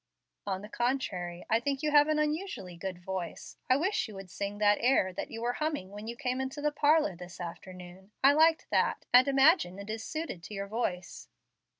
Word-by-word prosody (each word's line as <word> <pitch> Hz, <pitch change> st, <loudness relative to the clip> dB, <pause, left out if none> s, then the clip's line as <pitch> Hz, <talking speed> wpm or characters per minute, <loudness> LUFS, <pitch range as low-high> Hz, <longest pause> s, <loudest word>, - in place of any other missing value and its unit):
"On 190 Hz, 0 st, -2 dB
the -, -, -7 dB
contrary, 200 Hz, -8 st, -2 dB
I 225 Hz, -, +3 dB
think 275 Hz, +3 st, -2 dB
you 300 Hz, -, +1 dB
have 295 Hz, 0 st, +6 dB
an 310 Hz, 0 st, +1 dB
unusually 300 Hz, -, -2 dB
good 185 Hz, +1 st, -5 dB
voice. 180 Hz, -1 st, -6 dB
I 255 Hz, -, +6 dB
wish 370 Hz, +3 st, 0 dB
you 215 Hz, -, -10 dB
would 195 Hz, -2 st, -9 dB
sing 200 Hz, +1 st, -4 dB
that 205 Hz, 0 st, +3 dB
air 230 Hz, -7 st, +3 dB
that -, -, -5 dB
you 225 Hz, +1 st, -6 dB
were 240 Hz, +1 st, 0 dB
humming 295 Hz, -11 st, -3 dB
when 210 Hz, +2 st, -8 dB
you 235 Hz, -, -4 dB
came 255 Hz, -1 st, -2 dB
into 265 Hz, +3 st, -4 dB
the 300 Hz, +1 st, 0 dB
parlor 295 Hz, -, +3 dB
this 180 Hz, 0 st, -11 dB
afternoon. 180 Hz, +2 st, -9 dB
I 275 Hz, +1 st, +7 dB
liked 320 Hz, +2 st, +4 dB
that, -, -, +1 dB
and 250 Hz, +2 st, +8 dB
imagine 275 Hz, -, +4 dB
it 200 Hz, +2 st, -6 dB
is 220 Hz, 0 st, -5 dB
suited 310 Hz, -, -5 dB
to 210 Hz, -, -8 dB
your 195 Hz, 0 st, -3 dB
voice." 195 Hz, -5 st, -4 dB
225 Hz, 210 wpm, -30 LUFS, 190-290 Hz, -, and